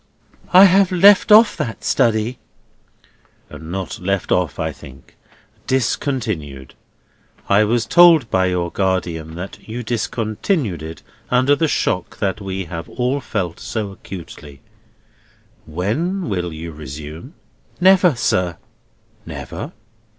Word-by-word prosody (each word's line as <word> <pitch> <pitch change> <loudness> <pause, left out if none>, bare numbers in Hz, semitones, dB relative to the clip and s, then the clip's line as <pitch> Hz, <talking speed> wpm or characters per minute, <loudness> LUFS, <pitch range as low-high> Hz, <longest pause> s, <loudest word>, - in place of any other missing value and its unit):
"I 185 +2 +9
have 195 0 +4
left 195 +3 +5
off 215 +1 +7
that 110 -4 -4
study." 115 +1 +1 1.1
"Not 85 +2 -6
left 100 +1 -2
off, 85 -7 +1
I - - -2
think. 65 -1 -15 0.5
Discontinued. 110 - -2 0.7
I 100 +2 +4
was 115 +1 0
told 170 -7 +6
by 95 -1 +2
your 90 -2 -1
guardian 85 -4 -2
that 95 +5 -9
you 120 +2 -5
discontinued 110 - -2
it 80 +1 -9 0.3
under 130 +3 +3
the 160 +3 +1
shock 90 - -1
that 100 +1 -2
we 95 -1 -4
have 85 0 -7
all 130 +3 -1
felt 90 -8 -4
so 110 -3 -4
acutely. 80 -7 -11 1.1
When 120 - -2
will 90 -3 -2
you 80 +1 -7
resume?" 75 - -9 0.4
"Never, 180 -4 +5
sir." 90 -7 0 0.7
"Never? - - -7
100 Hz, 115 wpm, -19 LUFS, 85-130 Hz, 1.1 s, I